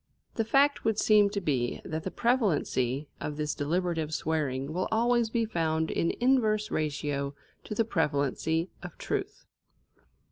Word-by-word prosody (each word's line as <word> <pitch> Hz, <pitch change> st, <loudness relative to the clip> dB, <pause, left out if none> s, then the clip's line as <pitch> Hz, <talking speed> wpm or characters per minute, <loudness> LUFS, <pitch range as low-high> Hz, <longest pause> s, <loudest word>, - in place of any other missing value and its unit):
The 225 Hz, -, 0 dB
fact 280 Hz, +5 st, +3 dB
would 220 Hz, -2 st, +1 dB
seem 210 Hz, -2 st, +5 dB
to 200 Hz, 0 st, -2 dB
be 130 Hz, -9 st, -1 dB
that 160 Hz, 0 st, -3 dB
the 190 Hz, -, -4 dB
prevalency 155 Hz, -, +1 dB
of 150 Hz, -1 st, -4 dB
this 150 Hz, 0 st, -1 dB
deliberative 160 Hz, 0 st, -1 dB
swearing 145 Hz, -3 st, -1 dB
will 185 Hz, +2 st, -1 dB
always 235 Hz, +1 st, +2 dB
be 230 Hz, 0 st, 0 dB
found 160 Hz, -6 st, 0 dB
in 165 Hz, -, +1 dB
inverse 225 Hz, -4 st, +2 dB
ratio 145 Hz, -2 st, -2 dB, 0.3 s
to 210 Hz, -, -5 dB
the 225 Hz, -, +2 dB
prevalency 160 Hz, -, 0 dB
of -, -, -9 dB
truth. -, -, -4 dB
165 Hz, 145 wpm, -29 LUFS, 150-220 Hz, 0.3 s, seem